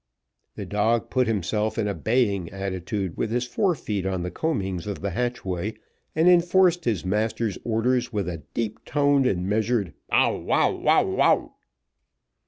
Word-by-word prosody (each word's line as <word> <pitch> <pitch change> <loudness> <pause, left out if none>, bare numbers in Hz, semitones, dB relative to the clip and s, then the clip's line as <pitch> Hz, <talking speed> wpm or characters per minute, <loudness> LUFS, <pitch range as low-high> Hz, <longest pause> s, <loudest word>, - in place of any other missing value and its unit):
The - - -6
dog 110 +3 0
put 130 -2 +2
himself 105 +1 -1
in 110 -2 0
a 100 - -1
baying 105 -8 0
attitude, 95 -1 -4
with - - -1
his 120 +2 0
forefeet 125 - -1
on 95 -2 -2
the 90 - -4
coamings 95 - -2
of 100 - -4
the 100 -1 -2
hatchway, 105 -2 -2 0.4
and 160 +3 +3
enforced 175 0 +4
his 105 -7 -1
master's 105 +1 -1
orders 120 +2 0
with 100 -5 -2
a 85 -3 -4
deep 110 -2 -3
toned 145 -2 +2
and 90 -4 -1
measured 110 -2 0 0.2
bow, - - +3
wow, - - +2
wow. - - +2
110 Hz, 150 wpm, -25 LUFS, 95-125 Hz, 0.4 s, enforced